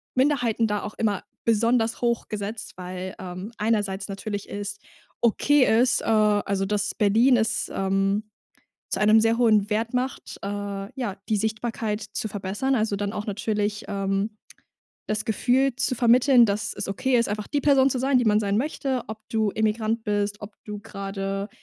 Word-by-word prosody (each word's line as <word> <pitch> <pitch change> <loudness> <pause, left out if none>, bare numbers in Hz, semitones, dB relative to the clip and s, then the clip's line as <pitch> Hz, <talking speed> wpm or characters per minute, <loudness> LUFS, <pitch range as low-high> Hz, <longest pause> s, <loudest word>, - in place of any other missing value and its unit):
Minderheiten 250 -4 +2
da 210 -1 -1
auch 210 - -5
immer 205 -4 0 0.2
besonders 230 +1 +2
hoch 235 -1 0
gesetzt, 215 +1 -5
weil, 185 +1 -6
ähm, 185 +3 -7
einerseits 205 -3 0
natürlich 205 0 -5
ist 205 0 -5 0.4
okay 275 +5 +4 0.2
ist, 250 0 +2
äh - - -7
also, 205 -3 +2
dass 205 +1 -1
Berlin 225 +5 +4
ist, 225 -1 0
ähm, 195 +2 0 0.6
zu - - -1
einem 215 +1 +6
sehr 225 +1 +3
hohen 215 -4 +3
Wert 225 +2 -1
macht, 255 +1 -3
äh, - - -4
ja, 205 +2 -4
die 215 - +2
Sichtbarkeit 220 0 -2
zu 210 0 -5
verbessern. 205 +6 -2
Also, 215 -4 0
dann 200 0 -2
auch 210 -1 -4
natürlich, 210 0 -2
ähm, 195 +2 -2 0.7
das 215 0 -2
Gefühl 250 +4 +2
zu 270 -1 0
vermitteln, 245 +1 +5
dass 210 +1 -1
es - - -5
okay 255 +5 +1
ist, 235 - +1
einfach 210 0 -3
die 290 - -1
Person 275 -2 +4
zu 255 - -1
sein, 265 +1 +2
die 245 - +3
man 210 -1 +4
sein 200 -1 0
möchte, 265 0 -1
ob 220 0 -6
du 220 -2 +1
Immigrant 220 +1 0
bist, 205 0 -1
ob 205 0 -9
du 210 -1 -6
grade 195 -1 -4
215 Hz, 170 wpm, -25 LUFS, 205-235 Hz, 0.7 s, einem